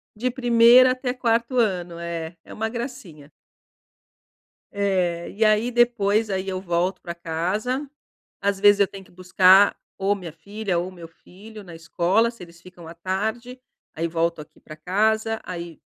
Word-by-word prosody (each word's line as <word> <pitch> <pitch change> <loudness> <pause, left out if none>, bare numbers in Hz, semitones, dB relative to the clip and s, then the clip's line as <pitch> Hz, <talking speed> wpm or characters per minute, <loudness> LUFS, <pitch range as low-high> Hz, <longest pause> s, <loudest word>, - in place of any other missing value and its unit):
de 250 +4 -2
primeiro 245 0 +6
até 255 0 -2
quarto 235 0 0
ano. 180 -7 0
É, 170 -1 -5
é - - -15
uma 220 +1 -3
gracinha. 230 - -8 1.4
É. 185 -4 -1
E 220 - -1
aí 215 +2 +3
depois, 225 -3 +2
aí 190 0 -3
eu 185 -1 -3
volto 175 +1 -1
pra 170 - -6
casa, 185 - -3 0.5
às 200 -1 0
vezes 205 0 +5
eu 200 - +4
tenho 195 0 -11
que - - -22
buscar, 185 +2 +4 0.2
ou 195 +1 +1
a - - -3
minha 180 -5 -8
filha 200 0 -3
ou 175 - -3
o - - -13
meu 170 -3 -11
filho 210 +6 -14
na 175 -3 -11
escola, 175 +7 +1
se 235 - -18
eles 170 -1 -15
ficam 175 -2 -14
à 165 - -9
tarde, 220 +8 -4 0.3
aí 165 +1 -2
volto 165 0 -1
aqui 155 +1 -17
pra 155 - -11
casa, 220 +6 0
aí 170 -3 -8
195 Hz, 170 wpm, -23 LUFS, 170-225 Hz, 1.4 s, primeiro